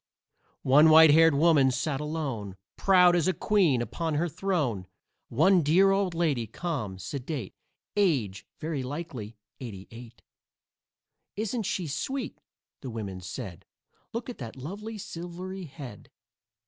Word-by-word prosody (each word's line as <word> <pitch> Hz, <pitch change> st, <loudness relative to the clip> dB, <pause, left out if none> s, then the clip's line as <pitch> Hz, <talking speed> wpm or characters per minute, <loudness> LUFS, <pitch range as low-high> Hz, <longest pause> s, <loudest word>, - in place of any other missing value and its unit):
One 150 Hz, +4 st, +6 dB
white 160 Hz, 0 st, +8 dB
haired 165 Hz, 0 st, +6 dB
woman 145 Hz, -3 st, +5 dB
sat 135 Hz, +3 st, -2 dB
alone, 135 Hz, -11 st, -4 dB, 0.2 s
Proud 180 Hz, -2 st, +5 dB
as 170 Hz, -1 st, +2 dB
a 185 Hz, -, +1 dB
queen 175 Hz, -, +2 dB
upon 160 Hz, +7 st, -3 dB
her 165 Hz, +4 st, +1 dB
throne. 145 Hz, -, -2 dB, 0.4 s
One 175 Hz, +9 st, +4 dB
dear 180 Hz, +6 st, +4 dB
old 195 Hz, -3 st, 0 dB
lady, 145 Hz, -9 st, 0 dB
calm, 115 Hz, -, -4 dB
sedate, 125 Hz, -, -5 dB, 0.4 s
Age, 135 Hz, -, 0 dB
very 155 Hz, -3 st, -3 dB
likely, 130 Hz, -6 st, -6 dB, 0.2 s
eighty 100 Hz, -7 st, -8 dB
eight. 120 Hz, +1 st, -12 dB, 1.1 s
"Isn't 220 Hz, 0 st, -2 dB
she 180 Hz, -, -2 dB
sweet?" 205 Hz, -, -4 dB, 0.4 s
the 130 Hz, -, -6 dB
women 100 Hz, -5 st, -6 dB
said; 90 Hz, 0 st, -7 dB, 0.5 s
"Look 230 Hz, 0 st, -4 dB
at 245 Hz, -, -7 dB
that 115 Hz, -4 st, -7 dB
lovely 205 Hz, -, -7 dB
silvery 180 Hz, +1 st, -7 dB
head!" 135 Hz, -8 st, -10 dB
150 Hz, 130 wpm, -28 LUFS, 120-180 Hz, 1.1 s, white